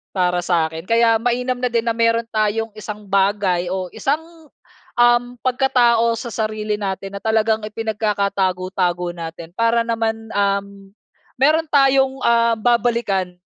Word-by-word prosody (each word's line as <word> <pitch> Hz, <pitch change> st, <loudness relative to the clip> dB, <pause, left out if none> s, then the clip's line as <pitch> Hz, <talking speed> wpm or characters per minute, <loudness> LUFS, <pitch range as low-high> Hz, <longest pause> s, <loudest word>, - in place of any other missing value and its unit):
para 180 Hz, -1 st, +1 dB
sa 165 Hz, -3 st, +1 dB
akin. 160 Hz, +2 st, -8 dB
Kaya 230 Hz, 0 st, +3 dB
mainam 250 Hz, +1 st, -1 dB
na 250 Hz, -, -1 dB
din 235 Hz, -1 st, +1 dB
na 230 Hz, -, +1 dB
meron 230 Hz, 0 st, +2 dB
tayong 220 Hz, +1 st, 0 dB
isang 210 Hz, -1 st, -8 dB
bagay 195 Hz, -3 st, +1 dB
o 185 Hz, -1 st, -3 dB
isang, 295 Hz, +4 st, 0 dB, 0.8 s
uhm, 240 Hz, 0 st, +3 dB
pagkatao 240 Hz, -3 st, +3 dB
sa 240 Hz, -, -6 dB
sarili 215 Hz, -1 st, -2 dB
natin 195 Hz, 0 st, -4 dB
na -, -, -10 dB
talagang 220 Hz, 0 st, +1 dB
ipinagkakatago-tago 195 Hz, -5 st, -1 dB
natin. 165 Hz, 0 st, -7 dB
Para 230 Hz, 0 st, +2 dB
naman, 225 Hz, -1 st, -2 dB
uhm, 200 Hz, -1 st, -2 dB, 0.5 s
meron 310 Hz, +4 st, +4 dB
tayong, 270 Hz, -1 st, +3 dB
ah, 235 Hz, 0 st, +3 dB
babalikan, 235 Hz, -6 st, 0 dB
220 Hz, 135 wpm, -20 LUFS, 195-235 Hz, 0.8 s, meron